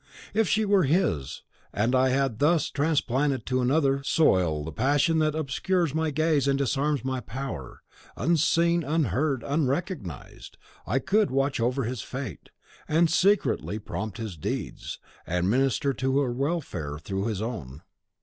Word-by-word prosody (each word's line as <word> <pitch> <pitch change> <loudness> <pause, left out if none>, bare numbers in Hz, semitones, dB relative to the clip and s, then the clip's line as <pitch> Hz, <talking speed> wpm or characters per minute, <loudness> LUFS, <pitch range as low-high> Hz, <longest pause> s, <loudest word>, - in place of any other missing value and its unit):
If 220 -2 +2
she 215 +2 +2
were 200 -4 +4
his, 140 - 0 0.3
and 115 +5 0
I 130 0 +4
had 130 -4 0
thus 160 +2 +2
transplanted 140 -3 0
to 130 -1 0
another 135 +1 +2
soil 90 - +2
the 80 - -6
passion 145 - +2
that 155 -1 +1
obscures 160 +2 0
my 160 0 0
gaze 155 -2 +1
and 140 0 +2
disarms 140 +1 0
my 130 -1 -1
power, 110 - -7 0.3
unseen, 170 +1 +2
unheard, 145 -3 0
unrecognised, 140 - -3 0.3
I 115 +9 +1
could 205 +10 +2
watch 135 0 0
over 125 +4 0
his 120 0 -3
fate, 130 - -7 0.4
and 160 +1 +3
secretly 195 - +2
prompt 110 0 -5
his 110 -7 -6
deeds, 75 - -4 0.3
and 90 +3 0
minister 135 +2 +1
to 130 +1 0
her 130 -3 0
welfare 130 - -3
through 95 +6 -3
his 105 -4 -2
own. 100 - -6
135 Hz, 145 wpm, -26 LUFS, 115-155 Hz, 0.4 s, were